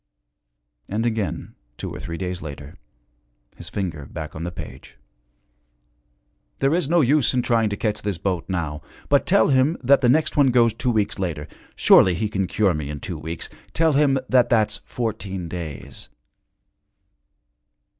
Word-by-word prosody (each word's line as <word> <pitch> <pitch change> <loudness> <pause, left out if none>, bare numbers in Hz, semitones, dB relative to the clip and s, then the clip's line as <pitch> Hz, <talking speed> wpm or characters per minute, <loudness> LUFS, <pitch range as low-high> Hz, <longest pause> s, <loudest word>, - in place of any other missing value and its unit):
And 110 +4 -1
again, 110 -4 -2 0.2
two - - -6
or - - -7
three 85 0 -6
days 90 0 -4
later, 75 +1 -8 0.8
his - - -9
finger 85 -8 -4
back 80 -2 -7
on 80 - -5
the 85 - -3
page, 65 -5 -10 1.6
'There 135 +2 +2
is 170 -4 0
no 170 0 +4
use 140 -1 +3
in 125 - +2
trying 115 -3 +2
to 100 - -3
catch 105 -2 -1
this 100 -4 -2
boat 90 -1 -2
now. 80 -5 -3 0.3
But - - +3
tell 110 - +4
him 135 +4 +3
that 135 +2 +5
the 125 - +3
next 155 +5 +2
one 145 -2 +5
goes 120 -3 +4
two 125 - -2
weeks 110 -4 0
later. 80 -5 -3 0.3
Surely 90 -2 +6
he 105 +4 -1
can 95 -3 -1
cure 100 -2 +2
me 75 -2 -4
in 75 -1 -5
two 80 +2 -6
weeks; 80 +2 -6 0.3
tell 160 -1 +3
him 140 -1 +3
that 125 -2 +4
that's 105 -3 +1
fourteen 100 -6 -4
days.' 80 -6 -7
100 Hz, 165 wpm, -23 LUFS, 85-125 Hz, 1.6 s, Surely